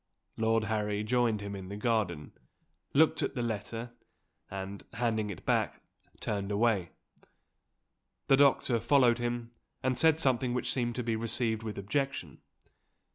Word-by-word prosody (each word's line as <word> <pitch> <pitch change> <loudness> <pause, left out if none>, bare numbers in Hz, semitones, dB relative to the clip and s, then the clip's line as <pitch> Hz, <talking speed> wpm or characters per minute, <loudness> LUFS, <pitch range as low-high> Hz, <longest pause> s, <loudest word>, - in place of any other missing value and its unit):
Lord 110 0 +2
Harry 105 -1 -1
joined 115 -2 +1
him 100 0 -5
in 95 -1 -7
the 100 - -5
garden 105 -9 -1 0.6
looked 155 +3 +4
at - - -1
the 120 - -1
letter 115 +1 -4 0.6
and, 95 +1 -6
handing 110 -2 0
it 100 - -8
back, - - 0 0.4
turned 100 -2 -2
away. 100 -4 +2 1.4
The 135 - +5
doctor 135 -4 +4
followed 125 -2 +4
him, 120 -1 -3 0.3
and 130 0 +1
said 160 +3 +4
something 130 -4 +1
which 125 - 0
seemed 120 -2 -1
to 125 - -2
be 115 -1 0
received 115 0 0
with 110 -2 -5
objection. 135 +8 -2
Mr. - - -38
115 Hz, 145 wpm, -31 LUFS, 105-125 Hz, 1.4 s, The